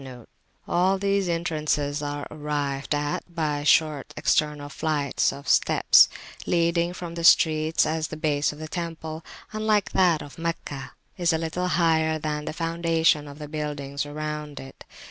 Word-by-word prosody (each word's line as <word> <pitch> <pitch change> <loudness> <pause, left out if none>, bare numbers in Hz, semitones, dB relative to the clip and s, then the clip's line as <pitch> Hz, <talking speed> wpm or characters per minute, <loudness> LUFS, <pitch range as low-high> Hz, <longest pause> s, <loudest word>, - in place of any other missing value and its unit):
[FN#70] 125 -3 -10 0.4
All 185 +3 +2
these 200 -1 0
entrances 150 -3 -1
are 145 0 -4
arrived 145 -2 -2
at 145 0 -1 0.2
by 150 -3 -1
short 150 -1 +2
external 150 -1 +1
flights 145 -1 0
of 140 0 -10
steps - - +5 0.4
leading 170 0 +2
from 175 -1 -7
the 170 0 -5
streets, 155 -1 +4
as 160 0 -1
the 155 - -7
base 150 -2 +1
of 150 - -11
the 155 +1 -7
temple, 165 -1 -5 0.3
unlike 215 -2 +1
that 175 -5 +3
of 145 - -12
Meccah, 155 -5 -4 0.3
is 175 -1 +3
a - - +2
little 165 +3 -2
higher 160 -3 +2
than 150 -1 -3
the - - -3
foundation 165 -2 +1
of 140 0 -10
the 150 -1 -7
buildings 145 -2 -4
around 150 -1 -5
it. 135 0 -12
155 Hz, 155 wpm, -25 LUFS, 145-165 Hz, 0.4 s, steps